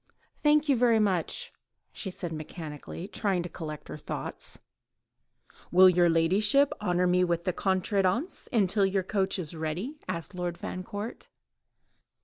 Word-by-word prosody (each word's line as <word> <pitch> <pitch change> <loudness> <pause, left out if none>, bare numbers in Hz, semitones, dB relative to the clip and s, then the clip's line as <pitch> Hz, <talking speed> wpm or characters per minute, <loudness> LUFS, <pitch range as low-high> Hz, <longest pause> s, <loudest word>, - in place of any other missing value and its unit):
"Thank 300 0 +4
you 280 - +4
very 235 -2 +4
much," 210 - 0 0.4
she 195 - -4
said 175 -2 -5
mechanically, 155 +2 -7
trying 195 -4 -1
to 175 - -6
collect 155 -3 -7
her - - -7
thoughts. - - -6 1.1
"Will 185 +1 +8
your 175 -1 +5
ladyship 205 +12 +3
honour 180 -3 +1
me 180 0 +3
with 170 -1 0
the 185 0 0
contredanse 195 - 0
until 205 -3 +3
your 195 0 0
coach 195 0 0
is 170 -4 -5
ready?" 175 - -4
asked 170 +1 -4
Lord 175 -1 -3
Fancourt. 205 +5 -6
185 Hz, 135 wpm, -28 LUFS, 175-210 Hz, 1.1 s, Will